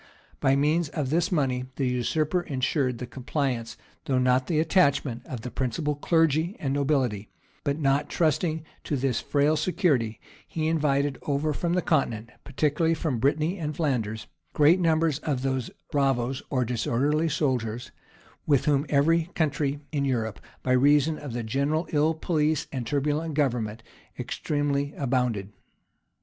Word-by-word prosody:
By 135 Hz, 0 st, +3 dB
means 150 Hz, +3 st, +2 dB
of 145 Hz, -4 st, -3 dB
this 170 Hz, +3 st, +1 dB
money, 130 Hz, -6 st, 0 dB
the 135 Hz, -, -1 dB
usurper 155 Hz, +8 st, 0 dB
insured 130 Hz, -4 st, -1 dB
the 125 Hz, -, -5 dB
compliance, 130 Hz, -2 st, -3 dB, 0.3 s
though 130 Hz, -, +1 dB
not 125 Hz, 0 st, +2 dB
the 160 Hz, -3 st, +1 dB
attachment, 145 Hz, -7 st, +2 dB
of 125 Hz, -4 st, -5 dB
the 125 Hz, +2 st, -6 dB
principal 140 Hz, +4 st, -1 dB
clergy 160 Hz, +4 st, +1 dB
and 135 Hz, -2 st, -1 dB
nobility; 135 Hz, -8 st, 0 dB, 0.3 s
but 140 Hz, -1 st, 0 dB
not 145 Hz, 0 st, +1 dB
trusting 160 Hz, 0 st, 0 dB, 0.2 s
to 150 Hz, -, -1 dB
this 125 Hz, -2 st, 0 dB
frail 145 Hz, +2 st, +2 dB
security, 155 Hz, -, +1 dB, 0.3 s
he 155 Hz, -1 st, -2 dB
invited 145 Hz, -3 st, +1 dB
over 150 Hz, +1 st, 0 dB
from 170 Hz, +3 st, -1 dB
the 180 Hz, -1 st, +1 dB
continent, 120 Hz, -7 st, 0 dB
particularly 150 Hz, +3 st, +1 dB
from 150 Hz, -6 st, -2 dB
Brittany 155 Hz, -, +1 dB
and 150 Hz, -2 st, -3 dB
Flanders, 115 Hz, -9 st, -1 dB, 0.3 s
great 155 Hz, +5 st, +5 dB
numbers 160 Hz, -3 st, +2 dB
of 140 Hz, -5 st, -2 dB
those 130 Hz, -2 st, -1 dB, 0.2 s
bravoes, 135 Hz, -2 st, +1 dB
or 130 Hz, -3 st, +1 dB
disorderly 140 Hz, +7 st, 0 dB
soldiers, 125 Hz, -6 st, -1 dB, 0.6 s
with 140 Hz, -4 st, +3 dB
whom 145 Hz, 0 st, +2 dB
every 160 Hz, +3 st, +3 dB
country 145 Hz, -2 st, 0 dB
in 145 Hz, -3 st, 0 dB
Europe, 115 Hz, -6 st, -1 dB, 0.2 s
by 130 Hz, -, 0 dB
reason 145 Hz, +4 st, +4 dB
of 145 Hz, -5 st, -7 dB
the 120 Hz, -1 st, -3 dB
general 140 Hz, +8 st, 0 dB
ill 155 Hz, +1 st, +2 dB
police 155 Hz, -2 st, 0 dB
and 130 Hz, -4 st, -4 dB
turbulent 150 Hz, +2 st, -1 dB
government, 115 Hz, -6 st, -1 dB, 0.3 s
extremely 145 Hz, -1 st, -1 dB
abounded. 125 Hz, -7 st, 0 dB
140 Hz, 145 wpm, -26 LUFS, 130-155 Hz, 0.6 s, great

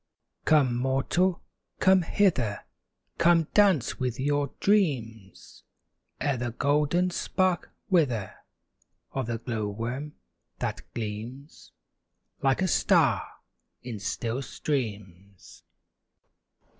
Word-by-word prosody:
Come, 140 Hz, -6 st, +4 dB
mortal, 135 Hz, +8 st, +1 dB, 0.4 s
come 190 Hz, 0 st, +5 dB
hither! 160 Hz, -, +1 dB, 0.6 s
Come 170 Hz, -2 st, +4 dB
dance 195 Hz, -, +3 dB
with 125 Hz, -2 st, -2 dB
your 145 Hz, 0 st, +1 dB
dreams, 120 Hz, -, -1 dB, 0.6 s
Ere 140 Hz, -3 st, 0 dB
the 120 Hz, 0 st, -2 dB
golden 150 Hz, +8 st, +1 dB
spark 185 Hz, 0 st, 0 dB, 0.2 s
wither 130 Hz, -, +1 dB, 0.8 s
Of 135 Hz, -4 st, -3 dB
the 115 Hz, -1 st, -2 dB
glow 110 Hz, -2 st, -3 dB
worm 120 Hz, +8 st, -5 dB, 0.4 s
that -, -, -3 dB
gleams 115 Hz, +6 st, -7 dB, 0.7 s
Like 135 Hz, +6 st, +2 dB
a -, -, +2 dB
star -, -, +3 dB, 0.6 s
in 120 Hz, -4 st, -6 dB
still 115 Hz, +5 st, -3 dB
streams. 100 Hz, -, -5 dB
135 Hz, 95 wpm, -27 LUFS, 115-165 Hz, 0.8 s, come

